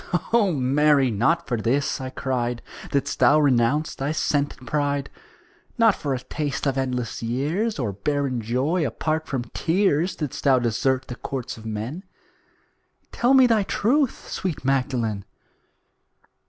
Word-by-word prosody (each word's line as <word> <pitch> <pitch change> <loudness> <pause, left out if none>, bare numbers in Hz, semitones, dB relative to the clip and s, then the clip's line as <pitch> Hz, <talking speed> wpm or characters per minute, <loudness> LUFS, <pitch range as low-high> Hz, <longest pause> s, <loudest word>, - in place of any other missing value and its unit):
'" - - -18
"O 215 -5 +4
Mary, 140 -1 +3
not 120 +11 +1
for 120 - -1
this," 130 +6 0
I 130 - -4
cried, 125 -3 -2 0.3
"Didst 140 - -1
thou 150 - +6
renounce 140 +2 +2
thy 140 +3 -2
scented 145 -4 -1
pride. 145 0 -1 0.7
Not 225 -3 +5
for 140 -6 -2
a - - -4
taste 145 +2 -3
of 135 -2 +1
endless 125 -3 -2
years 150 - -1
Or 120 -7 -1
barren 135 +3 -1
joy 130 +10 0
apart 155 +5 -2
from 130 -3 -2
tears 175 -1 +1
Didst 150 -5 -5
thou 135 -2 +5
desert 130 +2 0
the - - -5
courts 130 0 -5
of 110 0 -10
men. 110 - -4 1.1
Tell 250 +3 +3
me 260 -1 +7
thy 225 -3 +3
truth, 245 +7 0
sweet 175 -8 -4
Magdalen!" 125 -6 0
140 Hz, 145 wpm, -24 LUFS, 125-155 Hz, 1.1 s, me